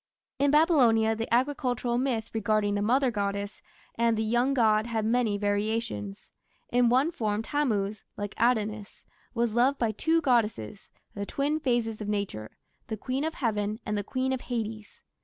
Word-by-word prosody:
In 285 +1 +3
Babylonia 255 -8 +4
the 225 +1 -4
agricultural 245 -1 0
myth 240 -4 -1
regarding 215 -1 +1
the 205 - 0
Mother 255 +4 +2
goddess 200 -1 -3 0.3
and 230 -1 +1
the 220 - 0
young 240 +5 +1
god 215 -2 +3
had 225 -2 -1
many 225 -2 +1
variations. 205 - -2 0.4
In 245 -1 +3
one 265 +7 +3
form 215 -6 -2
Tammuz, 215 -8 -1
like 205 -1 -4
Adonis, 215 -3 0 0.3
was 235 -2 0
loved 255 +4 +3
by 230 -2 0
two 325 +10 +1
goddesses 220 - 0 0.2
the 200 0 -5
twin 290 +3 -1
phases 240 -6 -1
of 210 - -4
nature 200 - -4 0.3
the 220 - -4
Queen 260 +6 -2
of 320 +1 -2
Heaven 215 -3 -1
and 210 - -2
the 205 - -1
Queen 260 +4 -1
of 260 - -3
Hades. 220 -3 -5
225 Hz, 160 wpm, -28 LUFS, 210-250 Hz, 0.4 s, Babylonia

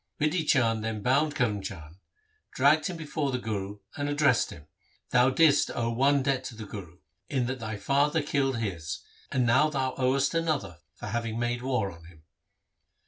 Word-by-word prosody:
Bidhi 155 +1 +1
Chand 115 -4 +3
then 110 -2 -3
bound 145 +5 +2
Karm 110 -8 0
Chand, 80 -4 -8 0.6
dragged 145 +6 +4
him 180 -3 -5
before 155 -2 -2
the 125 - 0
Guru, 105 -4 -4 0.2
and 145 -1 -2
addressed 145 -4 +3
him, 75 -2 -11 0.5
'Thou 125 +1 +5
didst 145 +1 +4
owe 115 -1 0
one 135 +3 +3
debt 135 -1 0
to 120 - -6
the 110 -1 -7
Guru, 95 -4 -9 0.3
in 130 -4 0
that 130 +1 -3
thy 110 -2 -4
father 145 +6 +1
killed 135 -3 0
his, 90 -8 -4 0.3
and 125 -1 +2
now 130 +6 +4
thou 135 -3 -1
owest 135 +3 +2
him 165 - +2
another 100 - -2 0.2
for - - -9
having 115 +1 -2
made 120 0 -1
war 125 -6 -1
on 85 -1 -14
him.' 80 -2 -17
125 Hz, 185 wpm, -28 LUFS, 110-140 Hz, 0.6 s, Thou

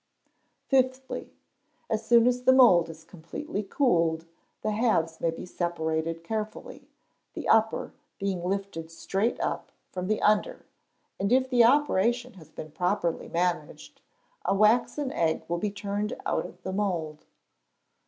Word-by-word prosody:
Fifthly. 260 0 0 0.6
As 220 0 -1
soon 235 0 +5
as 250 0 +2
the 260 - +5
mould 205 -11 +6
is 160 0 -11
completely 190 - -6
cooled, 170 - +1 0.4
the 215 - 0
halves 210 -8 +1
may 165 - +2
be 165 - -6
separated 165 -2 -2
carefully, 215 +3 -5 0.5
the - - -5
upper 220 0 +2 0.2
being 195 -3 -2
lifted 190 -3 -3
straight 195 +7 -1
up - - -3 0.2
from 185 0 -4
the 215 +1 +1
under, 210 0 +2 0.5
and 200 +3 0
if 260 +1 +4
the 240 -2 +6
operation 245 -2 +2
has 160 -5 -15
been 155 -1 -9
properly 180 0 -1
managed, 175 +1 -2 0.4
a 195 - +1
waxen 240 +6 +2
egg 160 -1 0
will 170 0 -1
be 210 - -1
turned 205 +2 -3
out - - -1
of - - -17
the 190 - -4
mould. 170 -7 -2
200 Hz, 140 wpm, -27 LUFS, 170-235 Hz, 0.6 s, mould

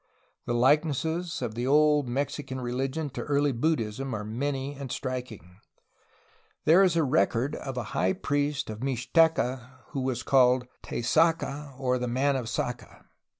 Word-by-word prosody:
The 120 - 0
likenesses 155 +5 +1
of 115 -3 -3
the 120 +3 -3
old 150 -1 +4
Mexi 140 +4 -2
can 130 -1 -5
religion 135 +4 -2
to - - -5
early 145 0 +1
Buddhism 130 -2 -1
are 105 - -4
many 135 +5 -3
and 140 -3 -7
striking. 125 - -5 1.1
There 165 +5 +6
is 180 -4 +3
record 130 -2 +1
of 135 -2 -6
a 125 - -1
high 95 +1 +2
priest 145 -3 -1
of 110 - -7
Mixteca 130 -1 +1 0.2
who 135 - -3
was 130 -1 -2
called 125 -2 +4 0.2
"Taysacaa," 150 0 0
or 125 -1 +1
"the 125 - -2
man 135 +4 +1
of 130 -3 -2
Sacaa." 120 -1 -4
130 Hz, 150 wpm, -27 LUFS, 125-145 Hz, 1.1 s, There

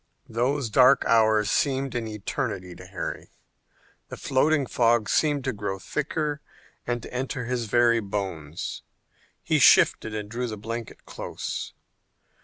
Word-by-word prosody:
Those 125 +1 0
dark 130 +3 +5
hours 110 -2 +3
seemed 135 -1 0
an 120 -2 -2
eternity 105 -3 -4
to - - -12
Harry. - - -5 0.8
The - - -7
floating 145 +2 +2
fog 115 -2 +2
seemed 145 -3 +2
to 130 - -1
grow 100 -2 -3
thicker 150 - -3 0.5
and 120 0 -2
to - - -10
enter 125 0 -3
his 120 -1 -2
very 120 +1 +3
bones. 95 -7 -4 0.6
He - - +2
shivered - - +6
and 105 -1 -4
drew 120 +3 -3
the 110 -2 -5
blanket 115 +2 -7
close. - - -6
115 Hz, 135 wpm, -26 LUFS, 105-130 Hz, 0.8 s, shivered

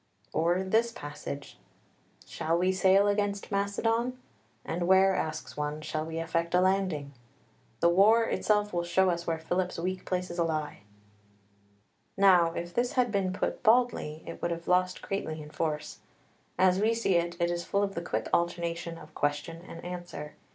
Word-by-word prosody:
Or 175 +4 +2
this 225 +5 +2
passage: 145 -6 -8 0.7
"Shall 165 +1 -1
we 185 +2 +2
sail 190 +2 +4
against 205 0 -1
Macedon? 225 +5 0 0.5
And 175 +1 -2
where, 190 0 +5
asks 155 0 -3
one, 150 +1 -3
shall 155 0 -3
we 165 0 -5
effect 165 +1 -1
a - - +5
landing? 185 -7 0 0.7
The 170 - +5
war 210 +6 +5
itself 210 -2 +1
will 175 0 0
show 180 +2 +3
us 170 0 -4
where 165 -1 0
Philip's 180 +3 -2
weak 185 +2 -3
places 180 -1 -3
lie." 155 -3 -1 1.4
Now 180 -4 +6
if 175 +1 -5
this 240 +1 0
had 250 -3 +2
been 195 -2 0
put 185 - -2
baldly 220 -9 +2
it - - -8
would 170 - 0
have 170 0 -5
lost 180 0 +1
greatly 160 -5 -3
in 150 0 -10
force. 155 -2 -3 0.6
As 185 +1 +4
we 225 +2 +3
see 225 -4 +1
it, 170 +1 -2
it 170 0 +1
is 175 0 -2
full 200 +3 0
of 195 -1 -2
the 170 - -3
quick 175 - -2
alternation 170 -1 -1
of - - -13
question 145 +3 -2
and 165 - -9
answer. 175 -4 -7
175 Hz, 165 wpm, -29 LUFS, 165-195 Hz, 1.4 s, Now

